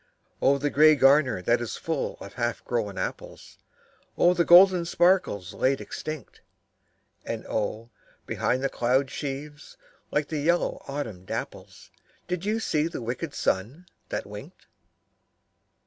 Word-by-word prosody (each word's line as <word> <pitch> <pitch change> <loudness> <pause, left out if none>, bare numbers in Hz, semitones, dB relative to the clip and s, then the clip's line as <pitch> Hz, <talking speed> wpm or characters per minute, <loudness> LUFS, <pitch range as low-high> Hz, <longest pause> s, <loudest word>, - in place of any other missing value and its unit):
Oh, 140 +1 +4
the 145 +1 -1
grey 155 +1 +6
garner 135 -7 +4
that 120 +5 +2
is 115 -3 -4
full 160 -3 -3
of - - -10
half 120 -1 -3
grown 110 -5 -2
apples, - - -6 0.6
Oh, 175 - +5
the 175 - +2
golden 180 +1 +7
sparkles 170 - +1
laid 135 +1 +1
extinct! 155 -2 -7 0.8
And - - -5
oh, 110 +2 -3 0.3
behind 130 +2 -1
the - - +3
cloud 130 +3 +1
sheaves, 145 +1 -7 0.3
like 150 0 -1
yellow 160 +3 0
autumn 125 -10 -5
dapples, - - -7 0.4
Did 180 +1 -3
you 215 +2 0
see 155 -7 0
the 170 - -6
wicked 125 +6 -4
sun 120 - -2 0.2
that - - -3
winked? - - -11
140 Hz, 130 wpm, -26 LUFS, 120-165 Hz, 0.8 s, golden